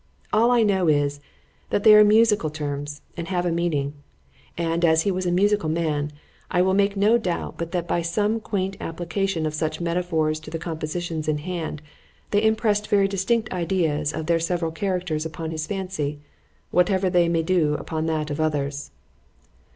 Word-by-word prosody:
——All 225 +3 +4
I 240 -2 +4
know 190 -4 +2
is, 145 -1 +2 0.5
that 205 - 0
they 215 - +8
are 210 0 +9
musical 210 -5 +4
terms, 145 -1 -5
and 170 -1 -5
have 180 -2 -1
a 175 - +1
meaning;——and 150 - -3
as 160 -1 +4
he 200 - +1
was 185 0 -2
a - - +1
musical 200 -2 +2
man, 155 -2 -1 0.4
I 180 0 +2
will 190 0 +2
make 200 +1 +2
no 215 +4 +4
doubt, 180 -6 -3
but 170 0 -4
that 175 -1 -1
by 170 - 0
some 205 +6 0
quaint 195 -3 -3
application 175 +1 -2
of 155 - -2
such 155 0 -2
metaphors 170 -3 0
to 155 - -11
the 165 - -4
compositions 160 0 -4
in 155 -1 +1
hand, 160 -2 -5 0.5
they 205 - +3
impressed 215 -1 +1
very 200 -1 +3
distinct 210 +3 0
ideas 165 -4 0
of 155 - -4
their 165 0 +2
several 165 0 -1
characters 180 -3 -2
upon 160 0 -5
his 155 -1 -4
fancy,—whatever 180 +1 -2
they 175 -2 +3
may 165 -1 +1
do 160 -4 +2
upon 160 +1 -3
that 155 -2 -1
of 145 +2 -2
others. 145 -2 -2
170 Hz, 175 wpm, -24 LUFS, 155-190 Hz, 0.5 s, are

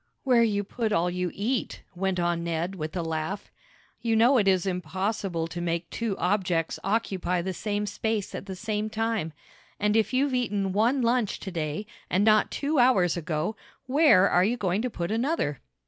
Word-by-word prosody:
"Where 250 -3 +4
you 205 -3 +2
put 220 +2 -2
all 175 -2 +2
you 180 0 -1
eat," 235 +4 -2
went 190 0 -1
on 175 -1 0
Ned 170 +2 -2
with 155 -3 -5
a 170 - -1
laugh. 160 +5 -4 0.5
"You 230 -1 +1
know 240 +4 +5
it 200 - +1
is 185 -2 +3
impossible 185 0 -2
to 175 +1 -6
make 170 0 -2
two 225 -4 -2
objects 180 -4 0
occupy 190 -4 0
the 190 +1 -2
same 205 +2 -2
space 210 0 -2
at - - -6
the 190 - -5
same 215 +2 -2
time. 220 -6 -1 0.5
And 210 +1 +2
if 220 -1 +2
you've 265 +1 +1
eaten 205 -6 0
one 240 +6 +2
lunch 235 -3 +1
to 190 - -5
day, 160 +3 -3 0.2
and 190 +3 +2
not 215 -1 +4
two 290 0 0
hours 200 -9 +4
ago, 170 +4 -2 0.3
where 255 - +5
are 180 - +3
you 230 +6 +1
going 195 -1 0
to 250 - -1
put 175 -4 -4
another?" 225 - 0
200 Hz, 185 wpm, -27 LUFS, 175-225 Hz, 0.5 s, know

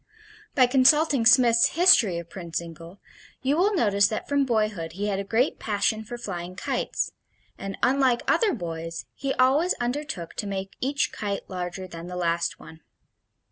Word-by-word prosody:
By 255 - +6
consulting 270 0 +4
Smith's 235 -2 +5
History 260 - +6
of 170 -1 -7
Prince 170 -2 -6
Zingle 170 +2 -8 0.4
you 270 +2 +2
will 395 +5 +2
notice 200 - +3
that 215 - -5
from 285 -1 +1
boyhood 215 -9 -1
he 205 +3 -3
had 195 -1 -1
a - - -2
great 230 +7 0
passion 215 +1 -1
for 240 +3 -7
flying 180 -5 -6
kites, - - -2 0.4
and 195 0 -7
unlike 260 -2 +2
other 445 -4 +3
boys, 165 -3 -6
he 275 0 -3
always 275 +8 +3
undertook 245 - -4
to 205 - -3
make 195 -1 -5
each 280 +2 0
kite 205 -2 -4
larger 180 0 -5
than 170 -1 -9
the 180 - -7
last 170 -1 -1
one. 160 0 -13
210 Hz, 165 wpm, -25 LUFS, 180-260 Hz, 0.4 s, By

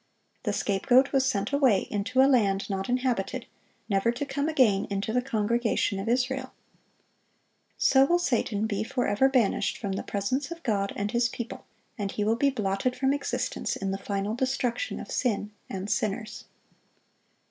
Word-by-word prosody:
The - - +1
scapegoat 245 +7 +3
was 265 -1 +2
sent 205 -2 -1
away 260 -9 +4
into 255 +6 +2
a - - +6
land 200 -6 +2
not 195 +2 -3
inhabited, 250 -2 -1 0.4
never 200 +2 +2
to 245 +4 -4
come 285 +2 -1
again 230 -10 +3
into 200 +2 -2
the 250 - +2
congregation 230 -4 0
of 195 - -3
Israel. 260 +1 0 1.2
So 265 0 +5
will 345 +5 +3
Satan 235 -9 0
be 210 -1 -1
forever 245 +1 +1
banished 250 -6 +1
from 200 -3 -4
the 195 - -2
presence 255 +9 -2
of 340 0 -8
God 200 -4 0
and 205 0 -2
His 235 0 +2
people, 235 -2 -7 0.3
and 200 -1 -2
he 210 - -2
will 220 +2 +2
be 280 +4 +3
blotted 215 0 -1
from 265 +1 +1
existence 285 - -2
in 195 -1 -3
the 195 - -2
final 200 +1 -2
destruction 260 - -1
of - - -8
sin 210 -4 -1 0.2
and 190 0 -4
sinners. 215 +1 -2
230 Hz, 165 wpm, -27 LUFS, 200-260 Hz, 1.2 s, a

